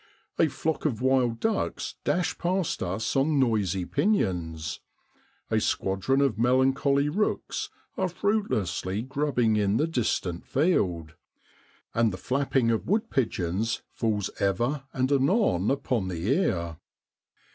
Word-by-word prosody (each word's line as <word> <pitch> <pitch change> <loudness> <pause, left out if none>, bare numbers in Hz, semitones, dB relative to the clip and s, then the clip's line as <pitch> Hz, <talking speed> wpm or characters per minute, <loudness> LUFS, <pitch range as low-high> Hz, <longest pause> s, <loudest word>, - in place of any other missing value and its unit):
A 165 - +5
flock 160 +2 -2
of 125 -8 0
wild 130 -3 +2
ducks 220 -2 -1
dash 180 0 0
past 185 0 -1
us 95 +5 -2
on 140 +2 +2
noisy 100 -8 +1
pinions; 85 - -1 0.7
a - - +3
squadron 95 +9 0
of 130 -7 +1
melancholy 135 +3 +3
rooks 205 +8 -1 0.3
are 185 -1 0
fruitlessly 125 - -1
grubbing 130 -5 +1
in 100 0 +2
the 150 - +2
distant 110 - -1
field; 90 - 0 0.8
and 115 -1 +2
the 90 - -5
flapping 130 +1 +1
of 115 - -1
wood 220 +4 0
pigeons 110 -3 -1
falls 105 -4 -1
ever 120 +9 0
and 130 +1 0
anon 140 - +2
upon 130 -7 0
the 90 0 -3
ear. 85 - -1
125 Hz, 125 wpm, -27 LUFS, 95-145 Hz, 0.8 s, A